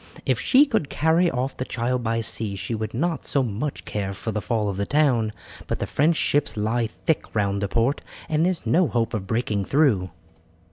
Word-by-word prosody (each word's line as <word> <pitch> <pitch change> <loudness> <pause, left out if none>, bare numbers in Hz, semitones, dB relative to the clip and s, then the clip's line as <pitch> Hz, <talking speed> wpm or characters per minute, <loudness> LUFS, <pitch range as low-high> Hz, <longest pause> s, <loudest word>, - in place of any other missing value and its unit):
If - - +1
she 280 +3 +5
could 220 - -1
carry 165 +5 +3
off 130 0 -2
the - - -2
child 125 0 -1
by 115 0 0
sea 110 -2 -3
she 100 - -4
would 110 0 -3
not 165 +5 -1
so 140 - +2
much 125 +6 -3
care 100 -2 -3
for 110 - -4
the 105 0 -2
fall 105 +2 0
of 100 -2 -2
the 100 - 0
town, 130 -7 +2 0.4
but - - -1
the - - -2
French 160 +3 +2
ships 145 -4 +1
lie 110 +2 0
thick 150 +6 -2
round 100 -1 +1
the 100 - 0
port, 115 +7 +1 0.3
and 155 0 +1
there 180 - +4
is 175 - -6
no 175 +1 +3
hope 115 -3 -1
of 100 -4 -3
breaking 110 -2 0
through." 125 -11 +2
120 Hz, 215 wpm, -24 LUFS, 105-150 Hz, 0.4 s, she